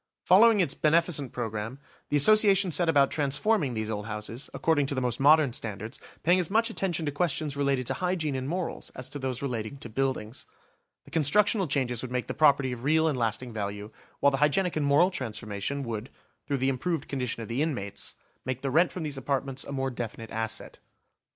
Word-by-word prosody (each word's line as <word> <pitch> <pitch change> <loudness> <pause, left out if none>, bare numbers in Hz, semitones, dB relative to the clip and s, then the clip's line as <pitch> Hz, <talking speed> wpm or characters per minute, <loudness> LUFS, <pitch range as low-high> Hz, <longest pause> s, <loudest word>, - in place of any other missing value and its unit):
Following 210 +3 +6
its 155 -6 0
beneficent 155 -3 +1
programme, 115 +1 -4 0.3
the 145 - +2
Association 200 +2 +6
set 170 +1 +2
about 140 -3 +4
transforming 145 - +1
these 110 0 -2
old 105 0 -4
houses, 110 +4 -5
according 145 -4 +1
to 140 - -2
the - - 0
most 125 -2 -1
modern 145 -2 +5
standards, 110 +2 -6 0.2
paying 175 +3 +4
as 175 - -1
much 225 +3 +2
attention 175 -6 -2
to 145 - -1
questions 150 -1 -1
related 140 -2 0
to - - -1
hygiene 180 -5 -1
and 130 +1 -3
morals 180 +1 -3
as 130 0 -5
to 145 - -6
those 130 -1 -3
relating 120 -1 -3
to 120 - -9
buildings. 125 -2 -3 0.6
The - - -16
constructional 195 - +3
changes 130 -5 0
would 130 - -5
make 125 0 -2
the - - -4
property 140 -4 +3
of 120 -1 -6
real 160 +3 +3
and 150 - +1
lasting 120 0 -2
value, 105 0 -5 0.3
while 140 - +5
the 135 - 0
hygienic 175 +5 +2
and 150 -2 0
moral 150 +7 +4
transformation 115 - -4
would, 115 0 -5 0.4
through 140 - 0
the 130 +1 +1
improved 145 +4 -2
condition 125 -4 -3
of - - -8
the 120 +6 -2
inmates, 100 -11 -3 0.3
make 130 +1 -4
the 135 - -1
rent 170 +5 +4
from 180 - -5
these 145 -3 -3
apartments 135 0 -2
a - - -8
more 135 -1 -2
definite 115 -2 -6
asset. 110 0 -4
140 Hz, 200 wpm, -28 LUFS, 120-160 Hz, 0.6 s, Following